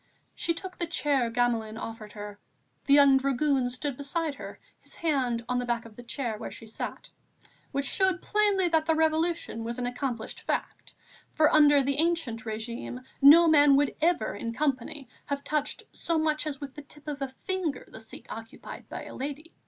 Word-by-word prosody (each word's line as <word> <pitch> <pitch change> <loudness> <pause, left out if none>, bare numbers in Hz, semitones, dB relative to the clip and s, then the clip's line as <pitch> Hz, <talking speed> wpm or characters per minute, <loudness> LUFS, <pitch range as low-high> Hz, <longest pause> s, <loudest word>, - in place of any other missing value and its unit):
She 335 - -1
took 370 +1 -8
the 345 - -1
chair 285 -6 +1
Gamelin 230 -2 0
offered 225 -2 -7
her. 205 -1 -8 0.5
The 280 - +7
young 280 -2 +7
dragoon 270 -1 +1
stood 255 +1 -4
beside 300 +2 -1
her, - - -9 0.2
his - - -11
hand 255 -8 0
on 250 0 0
the 245 - -2
back 240 -1 -1
of 225 -2 -13
the 245 - -9
chair 240 -1 -3
on 210 - -7
which - - -6
she 225 - -11
sat. 220 - -6 0.6
Which 280 0 -1
showed 380 +1 +2
plainly 410 -2 +2
that 320 -1 +2
the 320 - +3
Revolution 320 -6 0
was 235 +1 -4
an 250 - -2
accomplished 245 -2 -3
fact, - - -4 0.4
for 310 +1 +4
under 290 -2 +6
the 275 +1 0
ancien 330 -8 +1
régime, 235 +2 -5 0.2
no 315 +5 +9
man 290 -3 +7
would 285 0 +2
ever, 330 - +2
in 230 +3 -4
company, 275 0 -1 0.2
have 280 0 -2
touched 300 -1 -2
so 335 -1 -1
much 310 0 +1
as 280 -3 -4
with 280 -2 -7
the 295 - -8
tip 295 +1 -17
of 290 -2 -4
a 265 -1 -4
finger, 370 -8 -2
the - - -11
seat 220 - -10
occupied 225 0 -9
by - - -6
a - - -9
lady. 290 +4 -6
280 Hz, 190 wpm, -28 LUFS, 240-315 Hz, 0.6 s, no